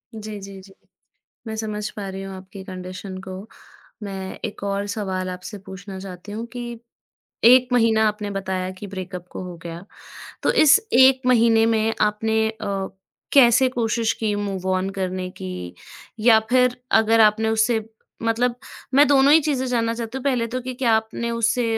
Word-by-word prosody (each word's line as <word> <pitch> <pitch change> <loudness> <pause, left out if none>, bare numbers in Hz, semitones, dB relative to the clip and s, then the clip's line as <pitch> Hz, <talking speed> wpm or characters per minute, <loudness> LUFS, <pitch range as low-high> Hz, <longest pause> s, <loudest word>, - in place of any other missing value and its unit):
जी, 215 -1 -7
जी, 195 0 -10
जी। 195 0 -17 0.7
मैं 220 - -4
समझ 210 -1 -3
पा 200 -2 -6
रही 190 0 -6
हूँ 195 0 -7
आपकी 190 +1 -11
कंडीशन 185 0 -7
को। 190 0 -8 0.6
मैं 195 -2 -6
एक 210 -3 -5
और 200 0 -1
सवाल 190 -3 -3
आपसे 185 +3 -7
पूछना 190 0 -9
चाहती 190 +1 -9
हूँ 225 +3 -5
कि 240 -2 -6 0.6
1 250 +2 +7
महीना 225 -2 +4
आपने 210 -1 -3
बताया 190 -2 -3
कि 190 +2 -9
ब्रेकअप 185 -2 -7
हो 180 -1 -6
गया। 170 +1 -7 0.6
तो - - +3
इस 310 +7 +7
1 260 +1 +6
महीने 230 -2 +4
में 225 -1 +1
आपने 220 +1 +1
अ, 200 -3 -4 0.5
कैसे 260 -1 +6
कोशिश 230 -2 0
की 215 -2 0
मूव 200 -2 -4
ऑन 185 +1 0
करने 185 0 -2
की 90 - -7 0.5
या 220 0 +6
फिर 250 0 +3 0.2
अगर 225 +1 +3
आपने 220 +1 +4
उससे 220 0 +2 0.4
मतलब 235 +2 +1 0.4
मैं 285 +3 +6
दोनों 280 0 +5
ही 320 - +8
चीज़ें 280 -4 -1
जानना 230 -2 0
चाहती 230 +2 -5
हूँ। 265 - -7
पहले 255 -4 +1
तो 250 +2 -3
कि 255 +1 -5
क्या 245 -2 +1
आपने 220 +1 -2
उससे 230 +1 +1
220 Hz, 170 wpm, -22 LUFS, 190-235 Hz, 0.7 s, ही